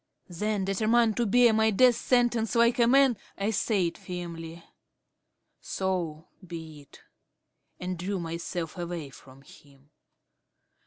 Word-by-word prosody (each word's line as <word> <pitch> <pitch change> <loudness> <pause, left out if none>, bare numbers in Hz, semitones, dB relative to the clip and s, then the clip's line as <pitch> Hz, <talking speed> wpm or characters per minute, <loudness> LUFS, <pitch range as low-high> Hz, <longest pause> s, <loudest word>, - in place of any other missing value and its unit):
Then, 205 +2 -2
determined 220 +3 +2
to 240 -2 +1
bear 240 +2 +5
my 220 0 +3
death 245 +4 +5
sentence 240 -2 +1
like 235 +1 +3
a 235 - +5
man, 265 -2 +4 0.2
I 200 +2 -1
said 195 -5 0
firmly, 170 -2 -7 1.0
"So 175 -4 -3 0.2
be 160 -4 -9
it," 140 - -18 0.8
and 180 -1 -4
drew 190 +2 -3
myself 170 0 -5
away 170 -5 -5
from 135 0 -16
him. 140 0 -20
185 Hz, 120 wpm, -27 LUFS, 165-225 Hz, 1.0 s, bear